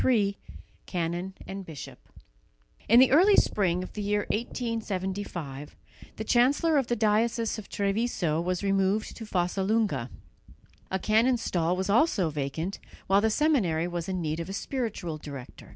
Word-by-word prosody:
III 205 -6 +3 0.5
CANON 175 +2 -3
AND 195 0 -6
BISHOP 160 -6 -9 0.9
In 230 +3 +8
the 260 - +6
early 375 +8 +6
spring 180 - +2
of - - -9
the 210 - -4
year 205 0 +1
1875 195 - -4 0.4
the 220 - -4
chancellor 280 +7 +3
of 265 - -2
the 240 - +1
diocese 225 +1 +1
of 205 - -11
Treviso 200 -6 0
was 180 +2 -2
removed 195 +2 +1
to 225 - -8
Fossalunga. 190 - 0 0.8
A 190 - 0
canon's 230 +5 +2
stall 175 0 0
was 190 +1 -1
also 210 - +3
vacant, 150 +6 -3 0.3
while 195 +1 +4
the 220 - +3
seminary 210 - +2
was 175 0 -4
in 185 -2 -2
need 155 +1 -2
of 165 +2 -5
a - - -4
spiritual 200 - -3
director. 140 -4 -10
195 Hz, 150 wpm, -28 LUFS, 175-225 Hz, 0.9 s, In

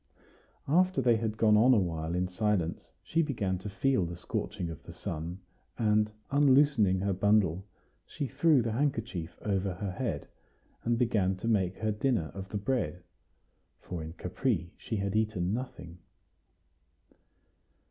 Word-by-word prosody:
After 180 +2 +3
they 120 -3 +4
had 110 -1 -2
gone 110 -2 +5
on 125 +4 +6
a - - +5
while 85 -2 -2
in 90 +1 0
silence, 90 -2 -1
she 165 - +1
began 105 - -1
to 105 +3 -6
feel 115 +2 +1
the 85 0 -4
scorching 85 0 -4
of 80 - -9
the - - -12
sun; 85 +4 -5 0.4
and, 105 -1 +2 0.2
unloosening 140 -9 +4
her 100 0 +1
bundle, 95 -2 +2 0.4
she 145 - -4
threw 140 0 +3
the 115 - -1
handkerchief 110 - -2
over 95 -3 0
her 100 +1 -3
head, 95 - -3 0.6
and 120 0 +1
began 105 -6 +2
to 95 +5 -5
make 95 -5 +1
her 110 0 0
dinner 105 -6 0
of 95 0 -7
the 105 - -2
bread; 105 -4 -1 0.8
for 90 -2 -6
in 80 +1 -7
Capri 90 - -2
she 115 - -5
had 100 0 -1
eaten 105 -4 0
nothing. 90 -8 -6
105 Hz, 150 wpm, -30 LUFS, 90-120 Hz, 0.8 s, on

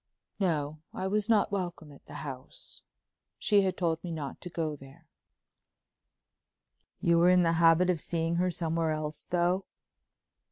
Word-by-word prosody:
"No—I 155 0 -2
was 210 +3 0
not 215 -3 +3
welcome 175 -5 -4
at 140 - -17
the - - -10
house. 130 -1 -9 0.6
She 205 -2 +3
had 190 -1 -1
told 165 -2 -1
me 180 - -5
not 150 -4 -5
to 180 - -6
go 160 -3 -2
there." 140 +4 -15 1.9
"You 170 0 +3
were 175 +1 +5
in 180 0 +5
the 165 -1 +2
habit 170 +2 +5
of 165 -4 -3
seeing 165 0 -1
her 180 +1 +2
somewhere 165 -1 -1
else, 155 0 -4
though?" 180 +2 +1
170 Hz, 150 wpm, -30 LUFS, 155-180 Hz, 1.9 s, were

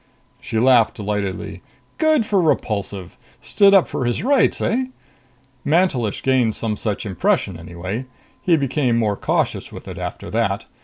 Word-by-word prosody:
She 110 - -4
laughed 120 -1 +4
delightedly. 105 -3 -4 0.4
"Good 310 -6 +3
for 200 -3 +2
Repulsive! 100 - -1 0.2
Stood 200 -1 +4
up 190 - +5
for 130 - -3
his 120 -1 -1
rights, 275 +2 +3
eh?" 255 +3 0 0.8
"Mantelish 145 - +1
gained 125 -5 +2
some 110 -2 -2
such 105 0 -3
impression 95 -1 0
anyway. 90 +9 -6 0.3
He 170 -3 +3
became 135 -3 0
more 105 -3 +1
cautious - - -1
with - - -10
it - - -7
after - - -6
that. - - 0
120 Hz, 145 wpm, -20 LUFS, 105-165 Hz, 0.8 s, up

